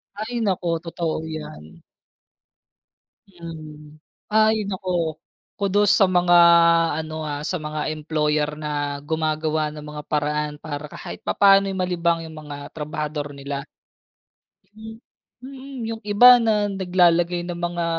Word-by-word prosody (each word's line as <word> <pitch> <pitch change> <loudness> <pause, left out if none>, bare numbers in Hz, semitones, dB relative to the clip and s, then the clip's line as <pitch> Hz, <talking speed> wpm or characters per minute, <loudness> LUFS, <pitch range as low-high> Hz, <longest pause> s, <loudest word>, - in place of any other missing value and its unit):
Ay, 220 +4 -5
naku 175 -3 0
totoo 165 -1 -3
yan. 80 - -9 1.5
Hmm, 155 -4 -11 0.3
ay 220 0 +5
naku, 185 -1 -5 0.7
kudos 200 +1 +2
sa 195 - +6
mga 175 -1 +3 0.7
ano, 155 0 -8
ah, 145 0 -4
sa 180 - -1
mga 150 0 -3
employer 150 -1 0
na 150 0 -6 0.4
gumagawa 155 0 -1
ng 150 - -8
mga 150 0 -7
paraan 150 0 -1
para 150 -1 -5
kahit - - -9
papaano'y 195 -1 +4
malibang 170 -2 0
yung 160 -1 -9
mga 145 -1 -9
trabahador 150 -1 -5
nila. 140 +1 -6 1.1
M 220 +1 -10 0.4
Mm, 265 -1 -9
yung 225 0 -5
iba 240 +4 +7
na 215 -2 +2
naglalagay 175 -3 +1
ng 175 - -4
mga 175 0 -2
165 Hz, 120 wpm, -22 LUFS, 150-195 Hz, 1.5 s, iba